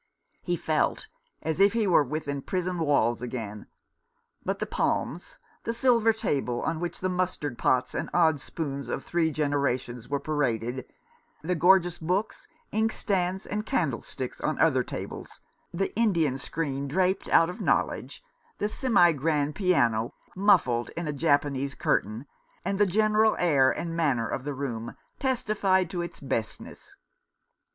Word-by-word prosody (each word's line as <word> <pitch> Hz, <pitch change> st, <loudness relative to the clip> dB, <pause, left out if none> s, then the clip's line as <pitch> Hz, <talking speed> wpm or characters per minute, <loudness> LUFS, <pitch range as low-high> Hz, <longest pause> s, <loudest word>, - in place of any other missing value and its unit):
He -, -, -1 dB
felt -, -, 0 dB, 0.3 s
as 160 Hz, +2 st, -2 dB
if 200 Hz, +2 st, +5 dB
he 230 Hz, -2 st, +1 dB
were 175 Hz, -6 st, +5 dB
within 140 Hz, 0 st, -3 dB
prison 180 Hz, +2 st, -2 dB
walls 140 Hz, -7 st, +2 dB
again; 110 Hz, -4 st, -6 dB, 0.8 s
but -, -, -1 dB
the -, -, -2 dB
palms, 170 Hz, +5 st, -2 dB, 0.3 s
the 230 Hz, -, -2 dB
silver 235 Hz, -2 st, +4 dB
table, 140 Hz, -, -1 dB
on 160 Hz, 0 st, -1 dB
which 175 Hz, 0 st, -4 dB
the 185 Hz, -, +1 dB
mustard 180 Hz, -7 st, -2 dB
pots 130 Hz, -1 st, +2 dB
and -, -, -3 dB
odd 160 Hz, -4 st, +3 dB
spoons 140 Hz, -3 st, -5 dB
of 135 Hz, -, -3 dB
three 170 Hz, -2 st, +1 dB
generations 140 Hz, -5 st, -1 dB
were 140 Hz, 0 st, 0 dB
paraded, 130 Hz, -5 st, -2 dB, 0.5 s
the 180 Hz, +3 st, 0 dB
gorgeous 175 Hz, 0 st, +4 dB
books, 185 Hz, +7 st, -2 dB, 0.3 s
inkstands, 195 Hz, -4 st, 0 dB
and 210 Hz, +2 st, -4 dB
candlesticks 270 Hz, -, -2 dB
on -, -, -1 dB
other -, -, +3 dB
tables, -, -, -7 dB, 0.3 s
the 190 Hz, +3 st, -2 dB
Indian 170 Hz, -, +2 dB
screen 140 Hz, -2 st, -3 dB
draped 185 Hz, +6 st, 0 dB
out 165 Hz, +1 st, +5 dB
of -, -, -9 dB
knowledge, -, -, -1 dB, 0.3 s
the 205 Hz, -, 0 dB
semi 215 Hz, -8 st, +4 dB
grand 150 Hz, 0 st, 0 dB
piano 120 Hz, -, +1 dB, 0.2 s
muffled 175 Hz, -, +3 dB
in 170 Hz, -2 st, -3 dB
a 150 Hz, -, -1 dB
Japanese 145 Hz, -2 st, +1 dB
curtain, 110 Hz, +6 st, 0 dB, 0.4 s
and 195 Hz, +1 st, -1 dB
the 205 Hz, -, +5 dB
general 215 Hz, +3 st, +3 dB
air 145 Hz, -7 st, +4 dB
and 165 Hz, -1 st, -3 dB
manner 135 Hz, -9 st, +1 dB
of 130 Hz, -, -4 dB
the 145 Hz, -1 st, -3 dB
room, 120 Hz, -4 st, -4 dB, 0.2 s
testified 205 Hz, -8 st, +1 dB
to 175 Hz, -, -2 dB
its 170 Hz, -, -6 dB
bestness. 115 Hz, -5 st, -5 dB
160 Hz, 145 wpm, -27 LUFS, 135-190 Hz, 0.8 s, if